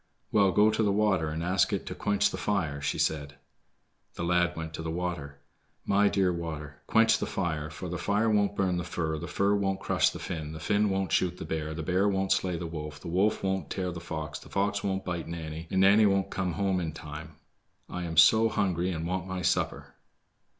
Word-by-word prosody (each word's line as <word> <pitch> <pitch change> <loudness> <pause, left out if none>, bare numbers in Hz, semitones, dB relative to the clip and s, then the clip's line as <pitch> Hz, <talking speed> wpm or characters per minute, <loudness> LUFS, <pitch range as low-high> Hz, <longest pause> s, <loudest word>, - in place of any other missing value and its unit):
"Well, 100 -3 +4
go 105 +4 +5
to 110 - 0
the 105 -2 +3
water, 100 -6 +2
and 80 +2 -3
ask 90 +1 +2
it - - -2
to - - -5
quench 105 -1 +1
the - - -4
fire," 80 -9 -1
she 70 - -1
said. 75 -2 -1 0.8
The - - -4
lad 90 0 +2
went 80 -1 -6
to 80 - -5
the 80 - -4
water. 80 -4 -4 0.5
"My 100 +1 +4
dear 95 -3 +2
water, 75 -4 -6
quench 110 0 +4
the - - -2
fire, 75 -5 -2
for 85 +3 -7
the 90 0 -4
fire 105 +4 +1
won't 105 -2 +2
burn 95 -3 +1
the 85 - -2
fir, 80 -2 -2
the - - -6
fir 100 +1 +1
won't 95 -1 0
crush - - +2
the - - -7
Finn, 80 -1 -5
the 80 - -7
Finn 100 +5 +1
won't 95 -1 -1
shoot 90 -1 +1
the - - -6
bear, 80 -1 -3
the 80 - -4
bear 95 +5 +2
won't 95 -1 0
slay 90 -2 +1
the 85 - -5
wolf, 75 -2 -6
the 85 - -7
wolf 95 +5 +1
won't 95 0 -1
tear 90 -1 -2
the 85 - -6
fox, 80 -4 -5
the - - -14
fox 100 0 0
won't 95 -1 -2
bite 85 -3 -3
Nanny, 80 -1 -6
and 95 - +1
Nanny 100 +2 +6
won't 100 -1 +1
come 95 -2 -1
home 95 +1 0
in 80 -3 -3
time. 75 0 -9 0.5
I 90 - -5
am 80 -1 -5
so 110 +7 +7
hungry 90 -4 0
and 80 -2 -3
want 90 +1 -2
my 95 -1 -4
supper." - - -1
90 Hz, 225 wpm, -29 LUFS, 80-100 Hz, 0.8 s, so